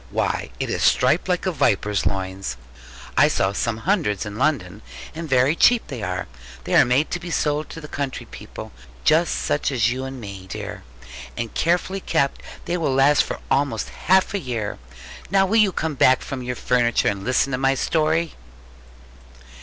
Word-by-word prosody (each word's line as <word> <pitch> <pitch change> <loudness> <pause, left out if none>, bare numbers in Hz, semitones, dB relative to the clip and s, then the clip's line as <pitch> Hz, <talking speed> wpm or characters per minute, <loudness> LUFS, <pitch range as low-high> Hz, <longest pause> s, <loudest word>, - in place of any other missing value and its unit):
Why, - - -1
it - - -2
is - - -2
striped - - +3
like - - 0
a - - +1
viper's 105 -1 +1
loins! 95 -8 -3 0.6
I - - +6
saw 95 +1 +1
some 110 +2 -1
hundreds 160 - +1
in 105 0 -6
London; 110 - 0 0.3
and 165 0 -6
very 130 +3 +3
cheap 240 +5 +4
they 130 -6 -5
are. 90 -1 -3 0.4
They - - -4
are - - +7
made 125 +5 +1
to 175 - -1
be 175 0 -7
sold 150 -2 0
to - - -8
the 150 - -9
country 140 -2 -4
people, - - -10 0.3
such 155 -2 +2
as 120 -3 +2
you 130 +1 -3
and 135 0 -7
me, 100 -4 -8
dear; - - -6 0.6
and 115 -1 -4
carefully 180 +3 0
kept 140 -6 0 0.2
they 175 - -1
will 150 -6 0
last 140 +1 +5
for - - -5
almost 140 +1 +1
half 190 +2 +2
a 200 - 0
year. 115 - -4 0.5
Now 195 +1 +4
will 210 +4 +1
you 210 -3 +5
come 160 -3 -2
back 130 -1 +4
from 135 -2 -5
your 125 0 -3
furniture, 120 -2 +1
and 100 -1 -1
listen 130 +3 +1
to 125 - -1
my 135 0 +2
story?' 160 +3 +1
135 Hz, 180 wpm, -22 LUFS, 115-160 Hz, 0.6 s, are